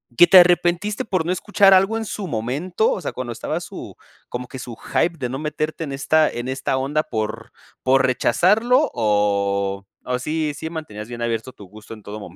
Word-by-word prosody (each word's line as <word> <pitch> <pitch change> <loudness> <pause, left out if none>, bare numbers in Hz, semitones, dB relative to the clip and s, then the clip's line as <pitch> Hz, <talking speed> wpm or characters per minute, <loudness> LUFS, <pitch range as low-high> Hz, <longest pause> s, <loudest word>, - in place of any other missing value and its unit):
¿Que 175 - +8
te 185 +2 +9
arrepentiste 175 +3 +2
por 185 -6 -1
no 175 - 0
escuchar 195 +1 +4
algo 195 +4 +4
en 225 - -4
su 205 -2 -5
momento? 145 - -1
O - - -3
sea, 150 - -3
cuando 125 -2 -5
estaba - - -3
su - - -9 0.3
como 125 0 -5
que 130 - -9
su 120 -2 -8
hype 170 0 -1
de 130 -4 -3
no 130 +2 -4
meterte 155 +1 -3
en 145 - -5
esta 155 +3 +2
en 120 +1 -5
esta 130 0 -1
onda 145 +4 0
por 110 -1 -4 0.3
por 135 +1 +4
rechazarlo 225 - +3
o, 100 -2 0 0.2
¿o 125 0 -1
sí 155 +2 -2
sí 160 +2 -6
mantenías 115 -10 -7
bien 120 -1 -7
abierto 115 +1 -2
tu 105 - -14
gusto 105 +4 -12
en 110 -2 -13
todo 105 +2 -7
momento? 90 -3 -11
135 Hz, 205 wpm, -21 LUFS, 115-175 Hz, 0.3 s, te